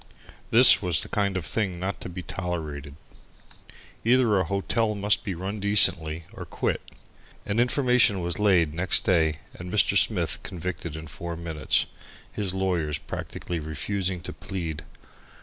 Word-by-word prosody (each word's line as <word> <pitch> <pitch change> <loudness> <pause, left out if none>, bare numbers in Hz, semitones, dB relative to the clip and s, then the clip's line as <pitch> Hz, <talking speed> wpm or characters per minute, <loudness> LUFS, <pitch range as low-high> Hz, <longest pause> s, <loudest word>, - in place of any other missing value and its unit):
This 120 +3 +7
was 90 -5 0
the - - -9
kind 100 -3 -1
of 90 - -5
thing 95 +1 -3
not 95 +2 -5
to - - -6
be 90 0 -8
tolerated. 80 -5 -6 1.1
Either 115 -4 +3
a 95 - 0
hotel 105 +4 -1
must 100 0 0
be 95 -4 -4
run 95 +5 -5
decently 85 -5 +6
or - - -8
quit. - - -3 0.6
An 105 +2 -2
information 125 -4 +2
was 85 +1 -1
laid 90 -7 +2
next 90 +3 +4
day 80 -6 +1
and 90 +1 -9
Mr. 105 -3 +2
Smith - - 0
convicted 85 -2 -6
in 80 0 -8
four 85 +2 -7
minutes, 80 -2 0 0.5
his 100 -3 -1
lawyers 90 -6 -2
practically 85 +3 -6
refusing 90 +4 -3
to - - -6
plead. 80 -6 -6
90 Hz, 150 wpm, -25 LUFS, 80-100 Hz, 1.1 s, This